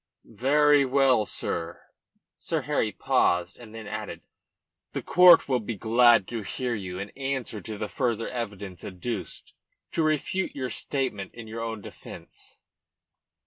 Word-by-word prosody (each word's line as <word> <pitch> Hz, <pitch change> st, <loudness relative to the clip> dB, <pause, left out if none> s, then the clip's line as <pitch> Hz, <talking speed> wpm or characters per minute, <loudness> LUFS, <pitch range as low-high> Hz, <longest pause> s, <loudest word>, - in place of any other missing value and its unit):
"Very 145 Hz, +5 st, +4 dB
well, 130 Hz, -4 st, +3 dB
sir." 85 Hz, -1 st, -3 dB, 0.6 s
Sir -, -, -2 dB
Harry -, -, 0 dB
paused 90 Hz, +4 st, +1 dB
and 115 Hz, -2 st, -12 dB
then 110 Hz, -1 st, -8 dB
added -, -, -6 dB, 0.7 s
"The -, -, -3 dB
court 180 Hz, -1 st, +7 dB
will 130 Hz, -2 st, +2 dB
be 110 Hz, +1 st, -5 dB
glad 115 Hz, 0 st, +4 dB
to 115 Hz, -2 st, -3 dB
hear 125 Hz, +4 st, -3 dB
you 95 Hz, -4 st, -5 dB
in 100 Hz, +2 st, -6 dB
answer 135 Hz, -5 st, -4 dB
to 110 Hz, +2 st, -6 dB
the 105 Hz, -, -3 dB
further 115 Hz, -3 st, -1 dB
evidence 100 Hz, -7 st, -6 dB
adduced 95 Hz, +2 st, -5 dB, 0.4 s
to -, -, 0 dB
refute 155 Hz, +5 st, 0 dB
your 130 Hz, -3 st, -3 dB
statement 115 Hz, -8 st, -3 dB
in 115 Hz, -1 st, -8 dB
your 115 Hz, +1 st, -6 dB
own 115 Hz, -2 st, -4 dB
defence." -, -, -12 dB
115 Hz, 145 wpm, -27 LUFS, 105-135 Hz, 0.7 s, court